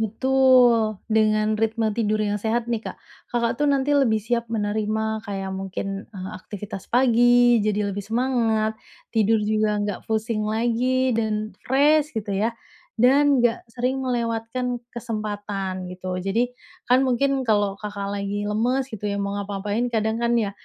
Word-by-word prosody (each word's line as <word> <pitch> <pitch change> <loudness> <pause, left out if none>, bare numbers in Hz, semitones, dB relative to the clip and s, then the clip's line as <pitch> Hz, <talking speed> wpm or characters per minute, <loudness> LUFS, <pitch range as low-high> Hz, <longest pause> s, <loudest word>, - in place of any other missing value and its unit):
Betul. 240 -1 +4 0.2
Dengan 215 0 +2
ritme 220 -1 0
tidur 215 -1 0
yang 205 0 -1
sehat 230 +2 0
nih, 230 -2 0
Kak, - - -6 0.3
Kakak 235 -1 0
tuh 295 - +3
nanti 280 +1 +2
lebih 265 -6 +3
siap 235 +1 -1
menerima 220 0 -1
kayak 195 -1 -4
mungkin, 195 +1 -5
eee, 190 -3 -7
aktivitas 205 -1 -8
pagi 245 -1 +4
jadi 210 -1 0
lebih 205 - -4
semangat, 225 -2 0 0.3
tidur 225 0 +3
juga 215 0 +1
nggak 205 -2 -3
pusing 220 -1 -1
lagi 245 +3 +1
dan 215 -2 -1
fresh, 295 +1 +3
gitu 205 -2 -3
ya, 220 +4 0 0.4
dan 270 +2 +4
nggak 235 0 +2
sering 255 +2 -1
melewatkan 240 0 -2
kesempatan, 205 -5 -4
gitu. 185 0 -5
Jadi, 195 +5 +1 0.5
kan 250 +1 +5
mungkin 270 +2 +1
kalau 205 -3 +1
Kakak 205 -1 -5
lagi 205 +1 -3
lemes, 250 +5 0
gitu 220 -4 -8
ya, 200 - -2
mau 200 0 -2
ngapa-ngapain 205 +3 -2
kadang 220 0 0
kan 235 0 +2
ya, 210 -3 0
220 Hz, 150 wpm, -23 LUFS, 205-245 Hz, 0.5 s, kan